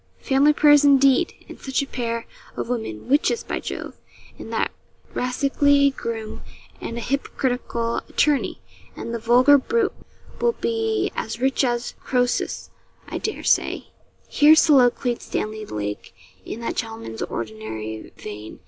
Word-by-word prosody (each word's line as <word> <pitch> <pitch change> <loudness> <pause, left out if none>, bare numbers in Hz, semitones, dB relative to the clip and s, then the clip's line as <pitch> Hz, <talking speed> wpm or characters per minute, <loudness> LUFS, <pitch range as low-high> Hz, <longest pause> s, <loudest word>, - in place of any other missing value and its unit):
'Family 275 +2 +4
prayers 295 -1 +6
indeed! 275 +2 +4
and - - -11
such 265 +1 -1
a - - -4
pair 230 -3 -3 0.3
of - - -3
women 220 - -4
witches, 295 - +2
by - - -3
Jove! - - -7 0.4
and - - -8
that - - 0 0.4
rascally 280 +2 +2
groom, 225 -4 -5 0.4
and 230 - -5
a - - -3
hypocritical 245 -3 -2
attorney! 295 -2 +1 0.4
And 230 - -6
the 235 - -2
vulgar 250 +5 +6
brute 450 - 0 0.5
will 475 0 +2
be 445 -2 -1
as 230 +1 -4
rich 265 +2 +1
as 240 -1 -1
Croesus, 245 -1 -1 0.4
I - - -4
dare 430 - -4
say.' - - +1 0.4
Here 300 +2 +6
soliloquised 250 -5 +4
Stanley 215 0 -4
Lake 105 -2 -5 0.3
in 230 - -6
that 230 - -3
gentleman's 225 - -5
ordinary 110 -1 -5
vein. 105 +1 -9
250 Hz, 135 wpm, -23 LUFS, 225-285 Hz, 0.5 s, prayers